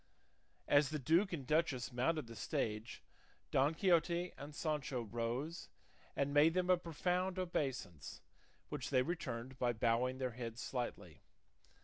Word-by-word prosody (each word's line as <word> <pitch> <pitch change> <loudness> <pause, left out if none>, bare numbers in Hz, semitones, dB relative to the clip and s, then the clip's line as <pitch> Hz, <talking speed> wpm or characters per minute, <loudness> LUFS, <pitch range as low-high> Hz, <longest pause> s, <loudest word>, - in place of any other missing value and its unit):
As 145 -1 +5
the 155 - -2
duke 165 +8 +3
and 150 -7 -4
duchess 145 -5 +1
mounted 145 +5 +1
the 115 0 -10
stage 105 +1 -3 0.5
Don 140 +4 +3
Quixote 175 -1 +2
and 145 +1 -9
Sancho 145 -6 -1
rose 120 +8 -3 0.5
and 140 0 0
made 155 +3 +6
them 185 0 +3
a 180 - +6
profound 180 +2 -1
obeisance, 135 - -3 0.5
which - - -4
they 130 - +4
returned 130 -6 -4
by 120 -1 +2
bowing 120 +3 +1
their 130 -1 -1
heads 115 0 -6
slightly. 125 -1 -4
140 Hz, 135 wpm, -37 LUFS, 120-165 Hz, 0.5 s, made